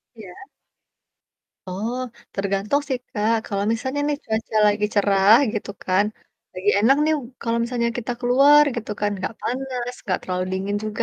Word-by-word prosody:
Iya. 200 -5 -11 1.3
Oh, 215 +7 -3 0.4
tergantung 200 +8 0
sih, 260 - -1
Kak. 215 +1 +1
Kalau 200 -1 -2
misalnya 260 +5 -2
nih 295 - 0
cuaca 220 0 -3
lagi 210 0 +2
cerah 200 0 +5 0.2
gitu 210 -1 -4
kan, 185 +2 +3 0.5
lagi 190 +3 0
enak 235 +7 +5
nih 315 0 +3 0.3
kalau 230 0 0
misalnya 235 0 -1
kita 245 +1 -3
keluar 275 +4 +6
gitu 230 -3 -5
kan, 205 0 +1
enggak 190 +4 -4
panas, 250 -1 -3
enggak 185 -4 -1
terlalu 185 0 -2
dingin 195 +2 -2
juga. 215 +2 -2
220 Hz, 150 wpm, -22 LUFS, 200-245 Hz, 1.3 s, keluar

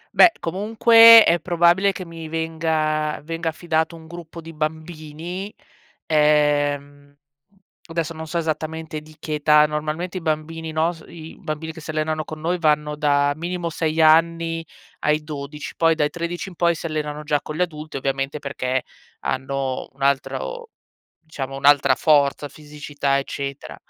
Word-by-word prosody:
Beh, 350 - +8
comunque 225 +5 +7
è 170 0 +3
probabile 175 +3 +3
che 185 -1 -7
mi 165 -1 -9
venga 160 -1 -1
venga 165 +1 -3
affidato 160 0 -1
un 160 -1 -13
gruppo 170 0 -10
di 165 0 -11
bambini. 160 +4 -5 0.5
Ehm, 145 -2 +1 0.7
adesso 165 -1 -3
non 160 0 -8
so 170 - -3
esattamente 160 -1 -3
di 155 0 -17
che 155 0 -5
età. 150 0 +5
Normalmente 155 +5 -3
i - - -5
bambini 160 0 -3
nos 160 +1 -1
i 160 -1 -11
bambini 160 -2 -5
che 160 - -11
si 155 - -11
allenano 155 0 -2
con 155 -1 -8
noi 175 +2 -1
vanno 150 -2 +1
da 145 -1 +2
minimo 170 +2 -4
6 160 0 -1
anni 165 +1 +3 0.4
ai 150 0 +1
12, 150 -1 -7
poi 165 -1 +3
dai 150 -2 0
13 175 +2 -4
in 180 - -14
poi 170 0 +2
si 160 - -8
allenano 150 -1 -3
già 145 -1 0
con 155 - -7
gli 180 - -2
adulti, 155 -4 -4
ovviamente, 135 +2 -2
perché 130 -3 -2 0.4
hanno 130 0 -3
un 135 - -8
altro 455 - -1 0.5
diciamo, 135 -4 -7
un'altra 140 -1 +4
forza, 145 -2 +2
fisicità, 145 -2 -3
eccetera. 140 0 -5
155 Hz, 150 wpm, -22 LUFS, 150-165 Hz, 0.7 s, Beh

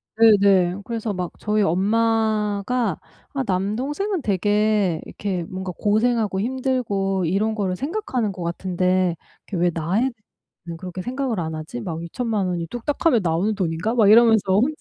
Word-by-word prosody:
네네, 200 -5 +5
그래서 225 -1 -3
막 180 -2 -4
저희 215 0 0
'엄마가 215 +2 +1 0.4
아, 275 -2 -1
남동생은 260 - -1
되게 205 -2 +1
이렇게 190 -4 -3
뭔가 185 +2 -5
고생하고 215 -1 +1
힘들고 220 -7 -1
이런 200 +6 +1
거를 195 -4 -1
생각하는 270 - -2
것 185 - -9
같은데 180 +1 0 0.3
이렇게 180 -4 -3
왜 175 - +3
나에 170 +5 0
대해 265 +1 +1 0.5
는 170 -1 -6
그렇게 185 +1 -6
생각을 255 -3 -2
안 160 -1 -3
하지? 155 +10 -6
막 170 -5 -5
20,000,000 210 +2 -2
원이 175 -2 -2
뚝딱하면 240 - 0
나오는 175 +6 +1
돈인가?' 180 +3 -1
막 215 -4 +5
이러면서 220 -3 +5
혼자 290 +7 +1
205 Hz, 325 characters per minute, -22 LUFS, 185-230 Hz, 0.5 s, 네네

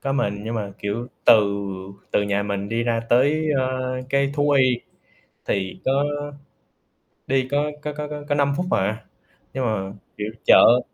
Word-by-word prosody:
Có 135 - -2
mình, 100 -7 -1
nhưng 115 - -3
mà, 100 -3 -3
kiểu, 105 +4 -3 0.2
từ - - +9 0.8
từ 100 - +3
nhà 100 0 0
mình 100 0 -3
đi 115 +1 -1
ra 115 -1 0
tới, 145 +6 +3
a, 130 0 +1 0.4
cái 140 0 +2
thú 145 0 +2
y 130 -3 +3 0.7
thì 95 -2 -2
có 130 - +2 1.4
đi 130 -1 +1
có 145 +1 +1
có 150 0 -3
có 150 0 -5
có 150 -1 -6
có 145 - +2
5 140 -1 +2
phút 180 - -1
à, 105 +3 0 0.5
nhưng 130 -1 -1
mà, 100 -4 -2 0.3
kiểu, 105 0 -2 0.2
chợ 120 +2 +7
125 Hz, 170 wpm, -23 LUFS, 105-140 Hz, 1.4 s, từ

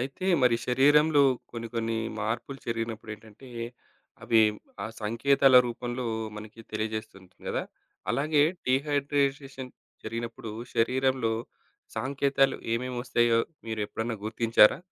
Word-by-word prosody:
అయితే 135 +9 -4 0.2
మరి 125 -2 +5
శరీరంలో 145 +4 +5 0.3
కొన్ని, 115 -1 -6
కొన్ని 115 0 -1 0.2
మార్పులు 115 +5 -3
జరిగినప్పుడేంటంటే, 115 +1 -6 0.8
అవి 115 -1 +5 0.4
ఆ - - -2 0.2
సంకేతాల 130 +4 +4
రూపంలో 120 +1 -4 0.3
మనకి 110 +1 -10
తెలియజేస్తూ 110 0 -3
ఉంటుంది 90 -1 -21
కదా! - - -1 0.5
అలాగే 145 +4 +3 0.2
డీహైడ్రేటేషన్ 140 -1 0 0.3
జరిగినప్పుడు, 115 0 -5 0.2
శరీరంలో 130 0 +2 0.6
సాంకేతాలు 135 0 +1 0.2
ఏమేమోస్తాయో 120 -1 +1 0.3
మీరు 110 -1 -3
ఎప్పుడైనా 115 +2 -3
గుర్తించారా? 115 +1 +4
120 Hz, 95 wpm, -28 LUFS, 115-135 Hz, 0.8 s, మరి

